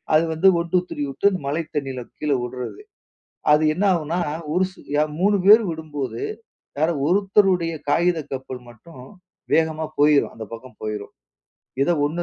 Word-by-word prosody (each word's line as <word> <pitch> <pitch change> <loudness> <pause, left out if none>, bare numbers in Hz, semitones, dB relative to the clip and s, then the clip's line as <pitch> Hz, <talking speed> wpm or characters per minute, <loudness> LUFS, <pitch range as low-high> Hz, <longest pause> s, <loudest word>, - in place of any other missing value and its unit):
அது 155 - +5
வந்து 160 +5 +3
1, 170 0 -3
2, 180 - +6
3 - - -5
வுட்டு 170 +9 +2
அந்த 185 - -3
மழை 155 +4 -1
தண்ணில 135 -3 -3 0.2
கீழ 150 -1 -1
வுடுறது. 125 - -6 0.7
அது 150 +1 +4
என்னாகும்ன்னா, 175 -3 +1 0.3
ஒரு 180 +2 +3
சு - - -20 0.2
ய 150 - +3 0.2
3 205 +2 +4
பேரும் 210 0 +7
விடும்போது, 145 -7 -5 0.6
யாரோ 160 +3 +2
ஒருத்தருடைய 190 -2 +3 0.2
காகித 170 +3 +2
கப்பல் 130 -1 -6
மட்டும் 125 +4 -14 0.5
வேகமா 160 -1 +2
போயிரும். 145 -1 +4
அந்த 110 - -7
பக்கம் 115 0 -11
போயிரும். 105 -1 -5 0.7
எதோ 175 - +2
1, 165 +4 -3
160 Hz, 150 wpm, -22 LUFS, 135-180 Hz, 0.7 s, பேரும்